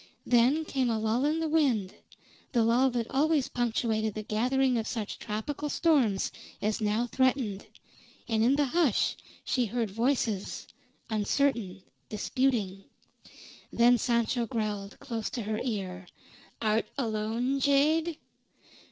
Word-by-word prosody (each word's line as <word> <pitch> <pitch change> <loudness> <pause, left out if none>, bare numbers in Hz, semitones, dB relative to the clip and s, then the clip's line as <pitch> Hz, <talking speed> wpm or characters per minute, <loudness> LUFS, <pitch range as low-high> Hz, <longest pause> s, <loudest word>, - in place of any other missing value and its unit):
Then 255 +6 +3
came 260 -4 0
a 225 - +1
lull 220 +4 +1
in 310 +2 +1
the 320 - 0
wind, 265 -12 +1 0.6
the 235 -3 +3
lull 240 +4 +4
that 240 -2 -1
always 295 0 +2
punctuated 220 -3 -1
the 215 - -4
gathering 250 +4 +1
of 220 - -4
such 220 -4 -4
tropical 270 +8 -4
storms 265 - +2 0.3
as 215 +2 -1
now 215 +3 +1
threatened; 245 -4 0 0.6
and 220 -2 +1
in 255 +4 +4
the 290 0 +2
hush 285 - +2 0.3
she 250 -3 +1
heard 230 -1 -2
voices 225 -3 -1 0.5
uncertain, 215 -3 0 0.3
disputing. 215 -4 -1 0.9
Then 240 +1 +4
Sancho 235 +1 +1
growled, 210 -4 -3
close 225 -2 -4
to 235 - -4
her 215 +1 -2
ear: 190 -6 -4 0.6
"Art 215 +1 +1
alone, 230 +2 -1
jade?" 305 +4 +2
235 Hz, 125 wpm, -29 LUFS, 215-270 Hz, 0.9 s, lull